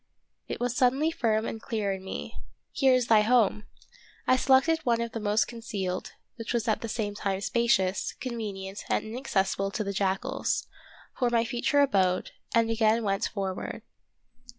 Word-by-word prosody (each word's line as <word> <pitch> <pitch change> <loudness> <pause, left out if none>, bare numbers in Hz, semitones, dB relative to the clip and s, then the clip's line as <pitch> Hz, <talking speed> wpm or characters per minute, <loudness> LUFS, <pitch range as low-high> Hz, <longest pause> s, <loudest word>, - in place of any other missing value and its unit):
It - - -4
was 245 0 -1
suddenly 270 +5 +3
firm 220 -7 0
and 225 - -5
clear 215 -4 -2
in 190 -1 -5
me, 75 - -6 0.2
— - - -49
here 265 -1 +4
is 250 -1 +2
thy 220 -2 +5
home! 215 -2 +3 0.6
I 255 - +5
selected 270 +5 +4
one 240 -7 +1
of 235 0 -2
the 225 - -4
most 210 0 +1
concealed, 205 -6 -4 0.2
which 230 0 -4
was 235 0 -1
at 220 - +1
the 230 - -4
same 210 -2 -2
time 195 -2 -2
spacious, 200 -4 +1
convenient, 205 -5 -5
and - - +1
inaccessible 200 -5 -1
to 215 +2 -2
the 200 -1 -3
jackals, 200 +7 -1 0.5
for 245 - +3
my 235 -1 +2
future 245 +5 +1
abode, 190 -9 +2 0.2
and 230 0 +3
again 225 0 +2
went 195 -1 0
forward. 195 -3 -4
225 Hz, 170 wpm, -28 LUFS, 195-240 Hz, 0.6 s, thy